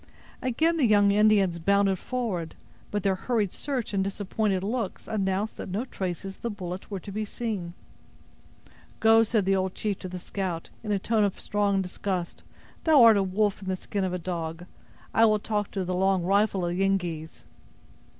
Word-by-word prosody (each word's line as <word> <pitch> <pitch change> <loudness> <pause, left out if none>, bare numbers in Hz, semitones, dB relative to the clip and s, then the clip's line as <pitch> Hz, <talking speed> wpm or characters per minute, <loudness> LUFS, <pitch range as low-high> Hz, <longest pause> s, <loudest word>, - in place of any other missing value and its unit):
Again 315 +7 +1
the 275 -6 +4
young 205 -2 +5
Indians 200 -4 +4
bounded 195 +1 +2
forward; 210 -11 -3 0.3
but 205 -2 -2
their 195 - +3
hurried 210 0 -1
search 260 -7 -3
and 195 -1 +2
disappointed 195 0 -1
looks 220 -1 -3
announced 200 0 -1
that - - -6
no 205 +7 -2
traces 190 -3 -5
of - - -28
the 235 - -2
bullet 185 -3 -6
were 200 -2 -4
to 200 - -9
be 215 +2 -2
seen. 205 -6 -4 1.2
"Go!" 225 0 +6
said 220 -3 +1
the 195 0 +3
old 190 -1 -1
chief 205 -3 -2
to 185 - -6
the 180 - -5
scout, 180 -2 -4
in 210 - -3
a 205 - +3
tone 215 +2 +1
of 200 -2 -1
strong 200 -2 +1
disgust; 180 -1 -4 0.4
"thou 305 -6 +6
art 225 -1 +8
a - - +3
wolf 195 +1 0
in 190 - -8
the 190 - 0
skin 200 +2 -3
of 185 - -1
a 180 - -1
dog. 170 -1 -4 0.5
I 225 - +5
will 215 -1 +4
talk 210 -1 -2
to 190 -2 -3
the 180 - -2
'Long 190 0 +2
Rifle' 195 0 +2
of 175 0 -1
the 190 - -1
Yengeese." 175 -5 -2
195 Hz, 190 wpm, -27 LUFS, 185-215 Hz, 1.2 s, art